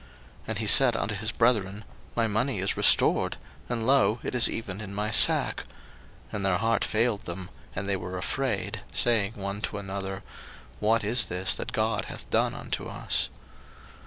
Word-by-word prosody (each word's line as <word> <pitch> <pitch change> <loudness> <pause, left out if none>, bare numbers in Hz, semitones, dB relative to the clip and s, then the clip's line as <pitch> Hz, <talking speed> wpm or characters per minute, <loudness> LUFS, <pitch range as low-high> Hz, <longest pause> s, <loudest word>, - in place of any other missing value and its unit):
01:042:028 60 - -22 0.4
And 110 - -2
he 110 - -3
said 125 +2 +6
unto 110 -1 -2
his 105 +2 -2
brethren, 105 -4 +1 0.3
My 115 - +1
money 110 +4 -1
is 95 +1 0
restored; - - +4 0.3
and, 115 -2 -2
lo, 125 -5 +3
it - - -4
is 125 -2 +5
even 105 -3 -5
in 100 -2 -7
my 105 +1 -2
sack: - - +6 0.7
and 100 - -4
their 95 -2 +1
heart 115 +2 0
failed 110 -1 0
them, 90 +1 -6 0.2
and 100 - -4
they 100 - +1
were 90 0 -6
afraid, 115 +2 -2
saying 110 -3 +2
one 100 0 -5
to 105 - -4
another, 95 0 -6 0.6
What 110 +2 +1
is 115 +3 +2
this 90 +1 0
that - - -5
God - - -1
hath - - -9
done - - +1
unto - - -5
us? - - -1
105 Hz, 175 wpm, -27 LUFS, 95-115 Hz, 0.7 s, said